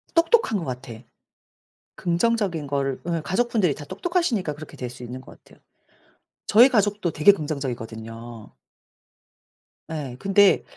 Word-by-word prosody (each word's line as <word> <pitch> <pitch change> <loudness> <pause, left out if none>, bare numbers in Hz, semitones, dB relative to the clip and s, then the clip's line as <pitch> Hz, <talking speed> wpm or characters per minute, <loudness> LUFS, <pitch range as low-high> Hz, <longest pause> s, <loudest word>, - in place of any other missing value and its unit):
똑똑한 335 - +3
것 170 - -5
같아. 125 -1 -6 1.0
긍정적인 175 -3 0
거를 135 -1 -2
예 170 -1 0
가족분들이 205 - +1
다 145 - -9
똑똑하시니까 225 - -1
그렇게 155 +1 -11
될 125 -1 -5
수 125 0 -12
있는 125 +1 -7
것 - - -16
같아요. - - -21 0.9
저희 235 +5 +7
가족도 205 -6 +1
되게 155 +7 +6
긍정적이거든요. 120 - -6 1.4
예 145 -6 -5
근데 195 0 +4
160 Hz, 295 characters per minute, -24 LUFS, 130-205 Hz, 1.4 s, 저희